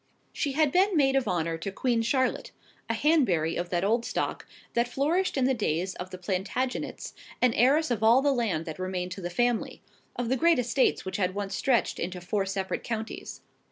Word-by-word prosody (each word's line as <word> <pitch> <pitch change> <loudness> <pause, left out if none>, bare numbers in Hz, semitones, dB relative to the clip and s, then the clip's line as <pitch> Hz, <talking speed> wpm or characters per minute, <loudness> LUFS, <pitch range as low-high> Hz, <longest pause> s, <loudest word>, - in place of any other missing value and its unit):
She 280 - -1
had 305 0 +2
been 375 +1 +3
maid 270 -2 +3
of 270 -2 +1
honour 165 -2 -1
to 195 +4 -4
Queen 235 +3 0
Charlotte: 260 +3 0 0.4
a 230 - +1
Hanbury 225 - +2
of 175 0 -3
that 175 0 0
old 230 +4 +2
stock - - -3 0.3
that 235 0 +2
flourished 300 +8 0
in 260 - +2
the 265 - +3
days 185 -5 -1
of 180 +1 -7
the 185 - -8
Plantagenets, 195 +8 -3 0.3
and 250 -2 +3
heiress 280 +5 +3
of 225 -3 0
all 235 +4 +5
the 285 -1 +3
land 210 -10 -1
that 160 +1 -7
remained 185 -1 -3
to 190 - -6
the 175 - -3
family, 240 +5 0 0.4
of 245 - -2
the 260 - +2
great 335 +1 +4
estates 250 -1 +1
which 190 - -3
had 185 -1 0
once 200 -1 -3
stretched 255 -4 +1
into 180 +1 -3
four 195 +3 -1
separate 195 -1 -3
counties. 225 -1 -5
230 Hz, 200 wpm, -28 LUFS, 185-265 Hz, 0.4 s, all